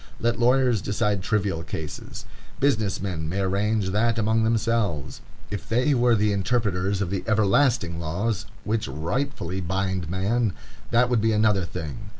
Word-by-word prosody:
Let 120 0 0
lawyers 125 -2 +3
decide 105 0 0
trivial 95 -3 0
cases. 80 -3 -7 0.3
Business 110 -8 +1
men 85 -5 -3
may 95 +4 -1
arrange 100 +1 0
that 115 +3 +1
among 110 +1 +2
themselves. 110 - 0 0.3
If 105 - -5
they 125 +5 +2
were 120 -2 +4
the 105 0 +2
interpreters 100 -2 0
of 90 - -4
the 95 - -2
everlasting 110 -4 +2
laws 95 +7 -2 0.2
which 110 -4 -1
rightfully 90 - -3
bind 95 -1 -2
man, 100 +4 0 0.4
that 120 +1 +4
would 120 -3 +3
be 110 0 +2
another 105 -3 +3
thing. 90 +5 -6
105 Hz, 150 wpm, -25 LUFS, 95-115 Hz, 0.4 s, were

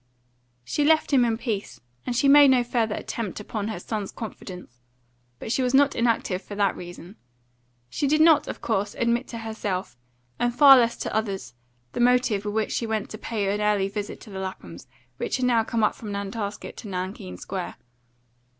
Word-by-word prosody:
She 295 - 0
left 310 0 +3
him 260 -3 +6
in 230 -2 +1
peace, 225 -4 -4 0.3
and 245 - -1
she 275 - +3
made 285 +1 +8
no 255 -2 +4
further 230 -3 0
attempt 220 -4 -4
upon 210 0 -4
her 220 -5 -4
son's 210 +1 -4
confidence. 180 - -9 0.6
But 220 - -6
she 260 - +1
was 250 +1 +1
not 280 0 +4
inactive 230 -5 0
for 205 - -9
that 200 -1 +1
reason. 175 +3 -10 0.7
She 285 - -1
did 305 +3 +3
not, 310 -2 +6
of - - -6
course, 205 -3 -1
admit 235 +1 0
to 235 - -7
herself, 220 -4 -4 0.4
and 240 0 0
far 280 0 +9
less 235 -2 +3
to - - -4
others, 195 - -2 0.4
the - - -5
motive 240 -4 +3
with 205 0 -3
which 220 -1 0
she 230 - -1
went 220 -2 -2
to 215 - -7
pay 200 -3 -1
an 210 - -2
early 205 -2 +2
visit 205 0 -5
to 215 - -12
the 190 - -6
Laphams, 95 - -7 0.3
who - - -1
had 255 - -2
now 240 -3 +3
come 225 0 -1
up 210 - +3
from 215 -3 -8
Nantasket 200 +1 -5
to - - -8
Nankeen 180 - -5
Square. 185 - -5
220 Hz, 195 wpm, -25 LUFS, 200-245 Hz, 0.7 s, far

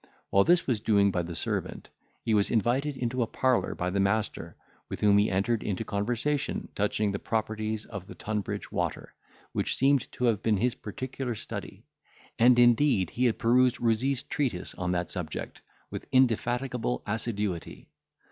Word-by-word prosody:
While 100 - +5
this 175 0 +4
was 120 -5 0
doing 100 -2 +3
by 90 - 0
the 85 0 -6
servant, - - -3 0.4
he 110 - +1
was 100 -2 +3
invited 130 +6 +1
into 125 0 -1
a 115 - +1
parlour 130 +1 +1
by 90 +1 -2
the 100 - 0
master, 100 +2 -1 0.3
with - - -5
whom 100 -1 +5
he 105 - +3
entered 100 +4 +1
into 105 +2 -3
conversation 120 +8 -1
touching 105 0 0
the 100 - -3
properties 110 -1 -2
of 100 -4 -8
the - - -10
Tunbridge 105 -3 -4
water, - - -3 0.4
which - - -1
seemed 135 -1 +2
to - - -5
have 115 -5 +2
been 110 -2 +2
his 120 +4 +1
particular 125 +3 -5
study; - - -7 0.5
and 120 +1 +6
indeed 120 - +4
he 125 - 0
had 115 - +2
perused 125 +2 +3
Rouzee's 120 +3 +1
treatise 125 -12 -2
on 90 -1 -2
that 90 0 -2
subject 90 -5 -5 0.3
with - - -6
indefatigable 125 - +1
assiduity. 105 -5 -3
110 Hz, 165 wpm, -28 LUFS, 100-125 Hz, 0.5 s, and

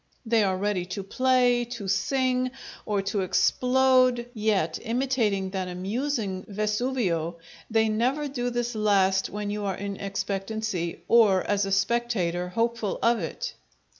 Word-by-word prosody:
They 225 -1 +3
are 190 -2 +1
ready 200 -2 0
to 200 - -3
play, 250 +2 +2
to 200 -4 -6
sing 255 +5 +1 0.4
or 205 -2 0
to 200 0 -1
explode, 255 +4 +3
yet, 210 -7 0
imitating 230 -6 0
that 190 -1 -3
amusing 195 +1 -2
Vesuvio, 210 -5 -1 0.3
they 225 -1 +3
never 250 +7 0
do 245 -3 -2
this 240 0 -2
last 195 -3 +2
when 205 0 -4
you 210 0 -3
are 195 -2 -1
in 200 0 -5
expectancy, 195 -2 -3
or, 210 -6 +5
as 205 -1 0
a - - -3
spectator, 195 -4 0
hopeful 230 +1 -1
of 235 0 +3
it. - - -4
215 Hz, 135 wpm, -26 LUFS, 195-240 Hz, 0.4 s, or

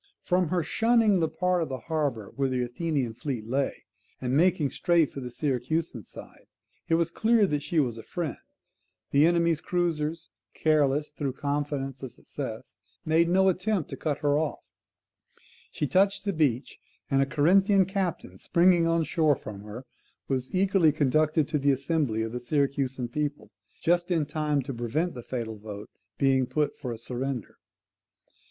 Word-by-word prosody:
From 180 -1 +2
her 175 +1 0
shunning 225 +1 +3
the 160 - +2
part 180 +3 0
of 160 - -2
the 130 - -3
harbour 145 -10 -2
where 135 -1 0
the 125 -1 0
Athenian 130 -1 -2
fleet 120 -2 -4
lay, 135 +4 -2 0.3
and 130 0 -1
making 165 -3 +3
straight 170 -4 +2
for - - -7
the 125 -2 -6
Syracusan 135 0 -2
side, - - -12 0.4
it 165 - +4
was 165 0 +1
clear 225 +1 +3
that 150 -6 -1
she 160 +2 0
was 120 -6 0
a - - -9
friend; 170 -6 -4 0.7
the 145 +3 +5
enemy's 170 -2 +2
cruisers, 165 -2 -2 0.2
careless 150 -2 +2
through 145 -3 -3
confidence 140 -1 -3
of 130 -3 -6
success, - - -7 0.3
made 165 +2 +3
no 190 +2 +4
attempt 190 -1 0
to - - -3
cut 150 -2 -2
her 145 0 +2
off; 155 -2 -3 1.1
she - - -2
touched 195 +6 +2
the 200 - 0
beach, 140 -6 0 0.3
and 135 0 +4
a - - +3
Corinthian 190 +7 +4
captain 190 -3 -3
springing 175 -1 +4
on 165 0 +2
shore 155 -2 +2
from 105 -5 -9
her, 105 +5 -9 0.4
was 130 -1 -2
eagerly 185 -4 +4
conducted 155 +1 +2
to 150 - 0
the 140 +1 +2
assembly 135 -5 0
of 110 - -4
the 125 - -4
Syracusan 135 -1 -1
people, 145 +2 -3 0.3
just 175 +1 +2
in 165 -4 +1
time 150 -1 -1
to 135 - -5
prevent 125 +9 -1
the 125 - -7
fatal 115 -3 -5
vote 105 0 -9 0.3
being 135 -2 +3
put 145 +3 0
for 125 -5 -5
a 115 - -5
surrender. 125 0 -5
150 Hz, 165 wpm, -27 LUFS, 130-170 Hz, 1.1 s, the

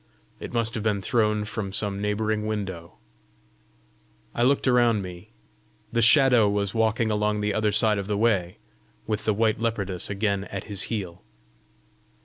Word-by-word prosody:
It - - -7
must 115 -2 0
have 110 - -3
been 105 -2 0
thrown 105 -2 +1
from 110 -3 -5
some 100 0 -1
neighbouring 105 +1 -1
window! 95 -6 -5 1.4
I - - -2
looked 135 +3 +2
around 120 -4 +3
me: 90 -1 -10 0.6
the 115 - +2
Shadow 120 -2 +5
was 100 -1 -1
walking 110 0 +1
along 105 0 0
the 105 0 0
other 110 0 +1
side 105 0 +2
of 100 - -5
the 105 -1 -1
way, 100 -6 +1 0.5
with 110 0 -3
the 110 - +2
white 110 0 +1
leopardess 100 -6 -2
again 100 -1 -1
at 95 -2 -6
his 100 -3 -3
heel! 95 -6 -4
105 Hz, 155 wpm, -25 LUFS, 100-115 Hz, 1.4 s, Shadow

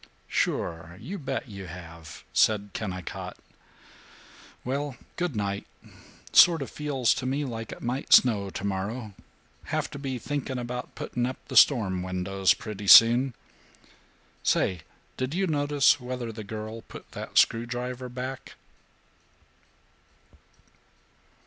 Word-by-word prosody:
"Sure. 85 +1 -2
You 195 - -6
bet 135 - -4
you 100 -4 -8
have," 85 -2 -10
said 105 -2 +3
Kennicott. 95 -6 -5 1.3
"Well, 140 0 -2 0.2
good 175 -6 -2
night. 100 -1 -2 0.7
Sort 165 -5 +7
of - - -9
feels 140 -5 +1
to 130 - -4
me 140 +3 -1
like 115 -3 -6
it - - -9
might 125 +3 -3
snow 105 -6 +6
tomorrow. 100 +4 -4 0.5
Have - - -2
to 140 - -7
be 135 -2 -3
thinking 135 +1 -3
about 125 0 -5
putting 120 0 -2
up 130 - -5
the - - -5
storm 100 -10 +5
windows 95 +1 +1
pretty 105 -2 -7
soon. 120 +4 +8 1.1
Say, 90 -4 +1 0.4
did 130 +4 -2
you 195 +1 +1
notice 145 -3 +3
whether 125 -2 -5
the 110 0 -8
girl 110 +2 -6
put - - -13
that - - -6
screwdriver 125 +2 +1
back?" 130 +2 -6
120 Hz, 120 wpm, -27 LUFS, 100-130 Hz, 1.3 s, soon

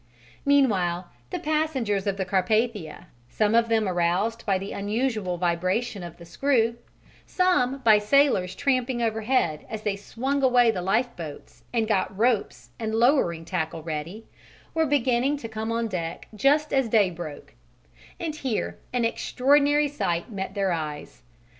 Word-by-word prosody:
Meanwhile, 190 -11 +2 0.2
the - - -3
passengers 270 -10 -1
of 195 -1 0
the 190 - -1
Carpathia, 200 -1 0 0.2
some 210 - +1
of 230 0 +3
them 220 -2 +2
aroused 185 +6 0
by 195 -2 +3
the 195 +2 -6
unusual 210 -3 -1
vibration 185 +5 -1
of 170 -1 -9
the 170 - -12
screw, 230 +5 +1 0.5
some 275 -8 +1
by 215 -2 +7
sailors 210 -5 +3
tramping 255 -2 0
overhead 220 - 0
as 220 -1 -6
they 205 -2 0
swung 260 +7 -2
away 245 -3 +5
the 185 - -4
lifeboats 190 - -3
and 225 -2 0
got 195 -2 0
ropes 205 - 0
and 220 -1 -2
lowering 225 - +2
tackle 160 -2 -3
ready, 165 +7 -5 0.5
were 320 -1 +2
beginning 270 0 +2
to 240 - -7
come 220 0 -4
on 230 0 0
deck 170 -5 -5
just 290 +7 +2
as 270 -4 +2
day 210 -4 +4
broke; 165 -4 -8 0.7
and 315 -3 -4
here 260 -7 -3
an 245 -2 +1
extraordinary 285 +5 +2
sight 175 -9 -2
met 195 -1 -5
their 195 -2 +1
eyes. 155 -3 -5
220 Hz, 145 wpm, -25 LUFS, 185-255 Hz, 0.7 s, by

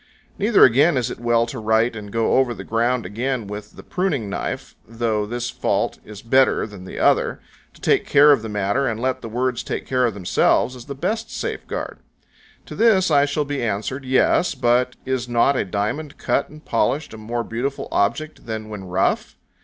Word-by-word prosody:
Neither 210 +2 +6
again 140 +5 +4
is 125 -1 -1
it - - -7
well 120 -1 +2
to 120 +1 -6
write 110 +2 +2
and 105 -2 -8
go 115 +1 +2
over 125 -3 +1
the - - -8
ground 115 +2 0
again 120 +4 -2
with 105 +1 -8
the - - -11
pruning 150 - -2
knife, - - -4
though 110 -2 -1
this 120 +2 -3
fault - - -1
is 105 -1 -11
better 130 +3 +3
than 100 -4 -11
the - - -9
other; - - +2 0.4
to - - -19
take - - +2
care 145 +1 +7
of 140 - +4
the 110 - -6
matter, 105 +6 0
and 110 -1 -2
let 130 +2 -1
the 115 - -7
words 125 +1 -1
take - - -4
care 125 -1 +2
of 110 - -4
themselves, 100 +6 +2
is 120 -2 -11
the 140 - -6
best 220 +10 -2
safeguard. - - -5 0.7
To - - -9
this 215 -5 +3
I 140 0 +5
shall 145 +1 -1
be 145 -1 -3
answered, 115 +5 -2
"Yes, 130 +6 +2
but 125 0 +2
is 130 -2 -2
not 120 +4 +3
a - - +1
diamond 110 - -3
cut 140 - 0
and 155 +1 -14
polished 150 -4 0
a - - -8
more 115 +2 -3
beautiful 125 +5 -3
object 120 +8 -1
than 110 -1 -5
when 105 -3 -7
rough?" 90 +1 0
120 Hz, 200 wpm, -22 LUFS, 110-140 Hz, 0.7 s, care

